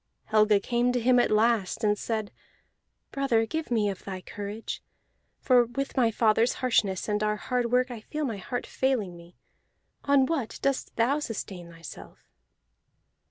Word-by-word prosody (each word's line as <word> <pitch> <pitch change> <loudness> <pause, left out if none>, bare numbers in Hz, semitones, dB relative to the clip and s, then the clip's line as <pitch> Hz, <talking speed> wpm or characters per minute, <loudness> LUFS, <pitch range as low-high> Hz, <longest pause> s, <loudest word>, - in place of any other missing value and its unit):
Helga 215 -1 +4
came 240 +4 +1
to 250 - +1
him 245 +1 +4
at - - +3
last, 215 -3 +2
and 210 -1 +3
said, 215 -1 -3 0.8
"Brother, 260 -5 +1
give 320 +6 -4
me 220 -4 +2
of 195 -2 -4
thy 190 -2 -5
courage, 205 +3 -6 0.6
for 250 -2 +4
with 275 +4 -4
my 245 -4 +4
fathers 225 +2 +3
harshness 205 -7 +1
and 210 -1 0
our 210 0 +1
hard 245 +2 -2
work 250 +1 +2
I 230 -3 -7
feel 300 +6 -4
my 225 -6 -3
heart 245 +6 -4
failing 240 -9 -1
me. 170 +1 -15 0.7
On 280 -1 +4
what 275 -7 -2
thought - - -11
dost 275 -1 -1
thou 255 +6 +2
sustain 195 - -6
thyself?" 165 -2 -11
230 Hz, 160 wpm, -27 LUFS, 210-255 Hz, 0.8 s, Helga